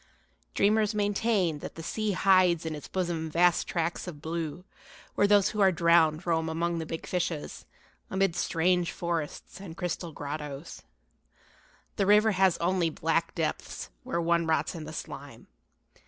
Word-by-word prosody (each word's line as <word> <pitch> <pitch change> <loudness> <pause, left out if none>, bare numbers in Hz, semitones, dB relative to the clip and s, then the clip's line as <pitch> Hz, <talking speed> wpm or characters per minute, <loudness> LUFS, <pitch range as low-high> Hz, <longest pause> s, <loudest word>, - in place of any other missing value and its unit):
Dreamers 215 +1 +2
maintain 205 -5 +1
that - - -8
the 165 - -8
sea 215 +4 -1
hides 185 -3 +4
in 160 - -2
its 150 - -8
bosom 170 -3 -2
vast 175 +2 +3
tracts 170 +1 -2
of 160 -5 -7
blue 165 +2 -4 0.5
where 205 - +3
those 205 -1 +5
who 210 - -2
are 190 -1 +6
drowned 170 -1 +3
roam 160 -2 0
among 170 +1 -1
the 160 - -5
big 165 - -5
fishes, 170 -4 -3 0.4
amid 190 -2 +1
strange 175 0 +1
forests 170 0 -4
and 175 -4 -9
crystal 175 -1 -3
grottoes. 145 +1 -6 1.2
The 195 - +1
river 210 +2 +5
has 190 -2 +3
only 175 -1 +1
black - - -1
depths - - -3
where 170 - -2
one 170 0 +1
rots 160 - +1
in 165 -3 -7
the 155 - -8
slime. - - -8
170 Hz, 155 wpm, -28 LUFS, 160-190 Hz, 1.2 s, are